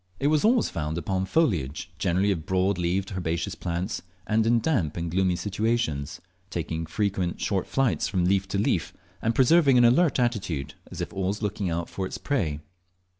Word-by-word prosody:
It 140 - +2
was 155 -1 +2
always 235 +2 +4
found 75 0 -3
upon 95 +2 -1
foliage, 90 - 0
generally 95 +4 +2
of 80 -5 -3
broad 95 0 +1
leaned 90 +3 -1
herbaceous 85 -3 -2
plants, 85 +4 -3 0.2
and 110 +1 +2
in 120 0 +4
damp 110 - 0
and 85 -1 -3
gloomy 95 0 +2
situations, 105 -8 -1 0.3
taking 80 -2 -3
frequent 95 -1 -1
short 95 -3 -1
flights 120 - +1
from 90 -2 0
leaf 95 +1 +2
to 95 - -2
leaf, 100 - 0 0.3
and 115 +1 0
preserving 135 +1 +5
an 120 - +6
alert 140 +5 +4
attitude, 100 - -1 0.2
as - - -6
if - - -4
always 95 +3 -2
looking 105 -2 -1
out 85 0 -2
for 95 -1 -4
its - - -6
prey. 80 - -1
95 Hz, 175 wpm, -26 LUFS, 85-115 Hz, 0.3 s, an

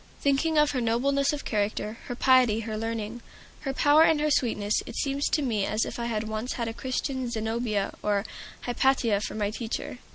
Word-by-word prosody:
Thinking 290 +3 +2
of 300 -1 +4
her 255 - -1
nobleness 275 +5 +2
of 295 -1 -5
character, 210 +1 -2
her 245 - -4
piety, 250 -4 +4
her 220 -1 -4
learning, 225 +1 -4 0.4
her 270 - -3
power, 290 +3 +5
and 320 -1 +5
her 300 0 +1
sweetness, 215 -6 +1
it 235 - -7
seems 280 0 0
to 300 - +1
me 220 -6 0
as 215 +3 0
if - - -6
I 235 - -2
had 220 -2 -1
once 220 +3 -3
had 235 -2 -3
a 225 - -3
Christian 260 +1 -3
Zenobia 220 -2 -1
or 205 0 0 0.4
Hypatia 245 -4 +2
for - - -4
my 205 -1 -1
teacher. 230 +2 -5
235 Hz, 195 wpm, -27 LUFS, 215-270 Hz, 0.4 s, power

